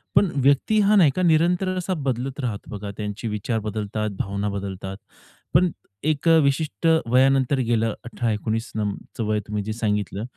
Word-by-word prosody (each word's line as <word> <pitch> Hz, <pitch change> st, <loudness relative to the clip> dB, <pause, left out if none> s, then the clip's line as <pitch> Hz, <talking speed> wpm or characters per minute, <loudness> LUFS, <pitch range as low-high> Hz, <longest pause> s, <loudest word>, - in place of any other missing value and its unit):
पण 190 Hz, -, +4 dB
व्यक्ती 140 Hz, +10 st, +3 dB
हा 205 Hz, +1 st, +4 dB
नाही 165 Hz, -9 st, +6 dB
का 185 Hz, -, 0 dB
निरंतर 175 Hz, +3 st, +3 dB
असा 185 Hz, +1 st, -1 dB
बदलत 135 Hz, -2 st, -3 dB
राहतं. 115 Hz, -7 st, -4 dB
बघा, 105 Hz, -1 st, -5 dB
त्यांचे 105 Hz, +2 st, -4 dB
विचार 110 Hz, +2 st, -2 dB
बदलतात, 110 Hz, 0 st, -3 dB
भावना 100 Hz, +1 st, -2 dB
बदलतात, 95 Hz, -1 st, -5 dB, 0.6 s
पण 175 Hz, +2 st, +4 dB, 0.3 s
एक 155 Hz, +1 st, 0 dB
अ, 165 Hz, -, +7 dB
विशिष्ट 150 Hz, +4 st, 0 dB, 0.2 s
वयानंतर 130 Hz, +2 st, +3 dB
गेलं 115 Hz, -3 st, +1 dB
18-19 115 Hz, -1 st, -2 dB
नं 105 Hz, -2 st, -1 dB, 0.2 s
चं 115 Hz, -, -1 dB
वय 110 Hz, 0 st, +1 dB
तुम्ही 105 Hz, -1 st, -2 dB
जे 110 Hz, +2 st, -3 dB
सांगितलं, 105 Hz, -2 st, -2 dB
115 Hz, 160 wpm, -23 LUFS, 105-145 Hz, 0.6 s, अ